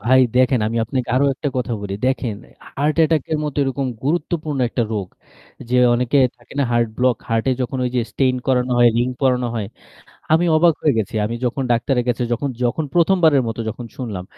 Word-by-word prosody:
ভাই 130 +5 +4 0.2
দেখেন, 130 -1 +3
আমি 115 +1 -2
আপনাকে 125 +1 -3
আরও 140 +2 +3
একটা 145 - -3
কথা 125 -1 -2
বলি। 100 -1 -5
দেখেন 130 -4 -1 0.4
heart 150 +3 0
attack 160 -2 +2
এর 155 - +1
মতো 150 - -4
এরকম 135 0 -1 0.2
গুরুত্বপূর্ণ 155 -1 -1
একটা 120 - -1
রোগ 100 -4 -3 0.6
,যে 125 - +2 0.2
অনেকের 125 +2 +3
থাকে 120 - -18
না 140 - +3
heart 120 -1 +2
block, 125 -1 +2
heart 115 -1 0
এ - - +3
যখন 130 +2 -3
ওই 125 - -1
যে 125 - +3
stent 130 -2 +1
করানো 125 -1 +1
হয়, 120 0 +7
ring 125 +2 0
পরানো 125 -2 +2
হয়। 110 -3 -2 0.7
আমি 165 +2 +4
অবাক 165 0 +4
হয়ে 150 - +3
গেছি। 110 +2 -3
আমি 110 +3 -2
যখন 125 +3 -1
ডাক্তারের 125 +1 0
কাছে 120 0 0
যখন 130 +4 -1 0.2
যখন 125 +6 0
প্রথমবারের 165 -5 +4
মতো 115 +1 -4
যখন 120 +2 -6
শুনলাম 105 -8 -5
125 Hz, 200 wpm, -20 LUFS, 120-140 Hz, 0.7 s, হয়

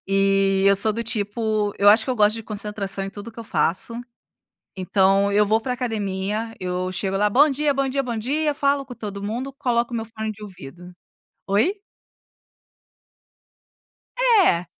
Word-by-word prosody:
E 195 0 +2
eu 200 - +6
sou 215 +2 +4
do 230 - -3
tipo, 215 -1 -1
eu 200 - +5
acho 220 +2 +6
que - - -3
eu 250 - -1
gosto 210 0 +4
de 225 - -6
concentração 205 -2 -4
em - - -5
tudo 205 +2 -9
o - - -11
que 225 - -15
eu 230 - -7
faço. 170 +5 0 0.8
Então 195 +2 +2
eu 210 +1 +4
vou 220 +2 +2
pra 250 +2 -3
academia, 220 -2 -3
eu 185 0 -3
chego 195 +1 -2
lá, 210 +1 +2
"bom 285 +8 +5
dia", 290 +1 +1
"bom 275 0 0
dia", 275 +1 -1
"bom 240 -3 -4
dia". 295 +6 0
Falo 280 -1 +1
com 250 - -9
todo 200 -3 -7
mundo, 235 +6 -4
coloco 240 -1 0
o - - 0
meu 225 - -3
fone 220 -1 -5
de 215 0 -10
ouvido. 180 -2 -11 0.5
Oi? 210 - +2 2.5
É. 405 - +4
215 Hz, 180 wpm, -22 LUFS, 195-240 Hz, 2.5 s, eu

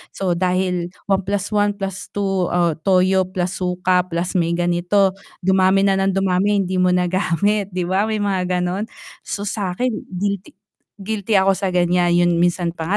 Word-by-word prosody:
So, 190 -2 -1
dahil 180 -1 0 0.2
1+1+2, 195 -1 -1 0.4
toyo, 185 0 +3
plus 185 -1 -3
suka, 180 0 +1
plus 170 +1 -2
may 170 0 0
ganito, 175 +3 +2 0.3
dumami 190 +1 +3
na 195 -1 +2
ng 195 0 +1
dumami 195 +2 +1
hindi 185 0 -2
mo 180 - +3
nagamit, 185 +3 +1
'di 180 -1 -1
ba, 195 +3 +2
may 215 -1 -1
mga, 180 -2 0
gano'n. 185 +4 -2 0.4
So, 205 - -3
sa'kin 205 +4 -2 0.2
guilty 200 0 -3 0.4
guilty 210 +1 -4
ako 195 0 +3
sa, 190 -2 -1
gan'yan. 175 0 +2
'Yun 175 0 +3
minsan 175 -1 0
pa 160 - -5
185 Hz, 145 wpm, -20 LUFS, 180-195 Hz, 0.4 s, toyo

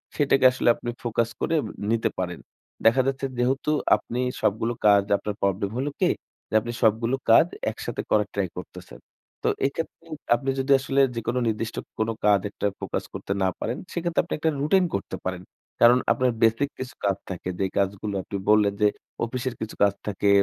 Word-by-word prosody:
সেটাকে 135 -3 +3
আসলে 130 - -2
আপনি 120 - -6
ফোকাস 115 0 0
করে 165 - +1
উম - - -5 0.2
নিতে 115 -1 +2
পারেন। 90 -2 -3 0.5
দেখা 115 +4 +6
যাচ্ছে 135 0 -1
যেহেতু 135 +4 +1 0.2
আপনি 120 - -5 0.2
সবগুলো 115 +3 +1
কাজ, 100 -1 +6
আপনার 105 -1 -4
প্রবলেম 100 0 0
হলো 140 +3 -1
কী? - - +3 0.4
যে - - -13
আপনি 120 - -5
সবগুলো 115 +3 +3 0.2
কাজ 155 - +8 0.3
একসাথে - - -5
করার - - +3
ট্রাই - - 0
করতেছেন। - - -9 0.4
তো - - +1 0.2
এক্ষেত্রে 165 +1 -4 0.3
আপনি 135 +3 -3
যদি 135 +1 0
আসলে 135 +1 +1
যেকোনো 120 +2 -1
নির্দিষ্ট 110 +1 -2 0.2
কোন 110 +1 +1 0.2
কাজ 100 -1 +5
একটা 105 - -5
ফোকাস - - -3
করতে - - -6
না - - +3
পারেন, 120 - -2 0.2
সেক্ষেত্রে 170 -1 +1
আপনি - - -5
একটা 160 +1 +1
রুটিন 185 +5 +4
করতে 100 -1 -4
পারেন। 90 -1 -3 0.4
কারণ 120 +1 +8
আপনার 125 -1 +2
বেসিক 115 +5 +3
কিছু 130 -3 -6
কাজ 100 -1 +2
থাকে। 90 0 -5
যেই 95 -1 0
কাজগুলো 100 +1 -1
আপনি 100 - -5
বললেন 105 -1 +5
যে, 105 - +6 0.4
অফিসের 125 +1 -3
কিছু 110 - -5
কাজ 100 -1 +4
থাকে, 100 0 0
115 Hz, 180 wpm, -25 LUFS, 100-130 Hz, 0.5 s, কাজ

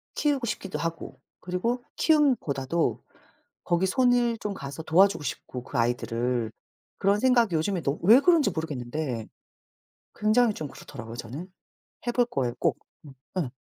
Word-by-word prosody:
키우고 285 -4 +1
싶기도 195 -3 -4
하고 165 0 -5 0.2
그리고 230 +8 -2
키움보다도 170 - +1 0.6
거기 175 +2 +1
손을 245 +1 +3
좀 205 -1 -3
가서 140 -2 -7
도와주고 185 +2 +4
싶고 125 -2 -5
그 - - -5
아이들을. 120 0 0 0.5
그런 200 +1 +2
생각 240 -4 +4
요즘에 170 +3 0
너 140 +3 0
왜 225 +7 +8
그런지 330 -1 +4
모르겠는데 130 -5 -4 0.9
굉장히 220 +2 +3
좀 155 - -5
그렇더라고요 125 -3 -10
저는. 135 +11 -7 0.5
해 240 - -1
볼 245 - +3
거예요 125 - -2
꼭. - - +1 0.3
음 140 -3 -12 0.2
예 150 -9 -1
170 Hz, 310 characters per minute, -27 LUFS, -, 0.9 s, 왜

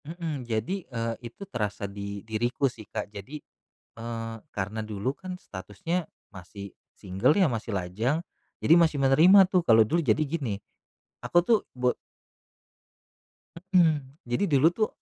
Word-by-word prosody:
Heeh. 165 -1 -4
Jadi, 115 - -1
eee, 115 -2 -2
itu 200 - -10
terasa 105 - -3
di 100 0 -6
diriku 120 +5 -1
sih, 120 -5 -4
Kak, - - -4
jadi, 105 +9 -7 0.6
eee, 115 0 -5 0.2
karena 105 +3 -3
dulu 110 +6 -3
kan 185 -1 -7
statusnya 105 - -4 0.3
masih 100 +1 -10 0.2
single 95 +8 +1
ya, 190 -5 +4
masih 115 -3 -4
lajang, 100 - -1 0.4
jadi 160 - +5
masih 160 -4 +3
menerima 175 +9 +7
tuh, 180 -2 +2
kalau 110 -4 +6
dulu 170 +4 +1
jadi 115 +1 +2
gini, 135 -9 -2 0.7
aku 175 - +3
tuh 225 +3 +4 0.2
bo 125 0 +1 1.8
Hmm, 155 -7 +3
jadi 120 +11 0
dulu 145 -2 +4
tuh 215 +4 0
125 Hz, 140 wpm, -27 LUFS, 105-165 Hz, 1.8 s, menerima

